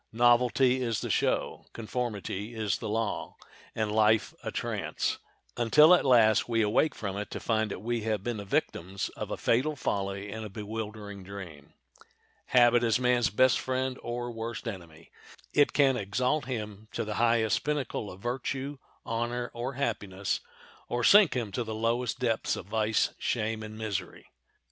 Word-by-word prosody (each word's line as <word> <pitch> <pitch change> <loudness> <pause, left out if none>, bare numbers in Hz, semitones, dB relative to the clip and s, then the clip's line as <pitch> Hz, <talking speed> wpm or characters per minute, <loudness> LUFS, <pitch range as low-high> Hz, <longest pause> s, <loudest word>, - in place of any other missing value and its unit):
Novelty 120 +2 +4
is 115 -4 -1
the - - -2
show, - - 0
conformity 110 -2 -4
is 110 -3 -1
the - - -4
law—and 110 0 -4
life 110 0 +3
a - - -3
trance, - - -2 0.4
until 150 +8 +6
at 180 - +5
last 115 -4 +4
we 115 -1 +2
awake 110 +9 +2
from 100 -3 -4
it 105 - -4
to - - -5
find 110 -2 0
that 100 - -6
we 120 0 -1
have 105 -2 -1
been 120 -1 -2
the 100 - -5
victims 95 -1 -2
of - - -7
a - - -3
fatal 135 +6 +1
folly 100 -5 -2
and 110 +1 -5
a 110 - -6
bewildering 105 -1 -6
dream. 90 -7 -10 0.7
Habit 120 -1 +5
is 115 +1 +2
man's 125 -1 +3
best 130 +4 +4
friend 130 0 -2
or 120 0 -4
worst 115 0 -5
enemy. 85 -6 -8 0.4
It 145 -1 +4
can 135 -2 +4
exalt 125 +7 0
him 110 -4 -5
to - - -2
the 105 - -3
highest 115 -2 +2
pinnacle 145 -8 -2
of 90 +1 -11
virtue, 130 +3 -3 0.3
honor, 120 +1 -2
or 120 +3 -4
happiness, 100 -7 -2 0.5
or 120 0 -1
sink 200 - +7
him 115 -5 -2
to 120 - -2
the 110 -1 -5
lowest 115 +3 0
depths 115 -4 0
of - - -7
vice, 110 +1 +1
shame, 110 +1 -1
and 110 0 -8
misery. 110 -3 -4
115 Hz, 165 wpm, -29 LUFS, 105-125 Hz, 0.7 s, sink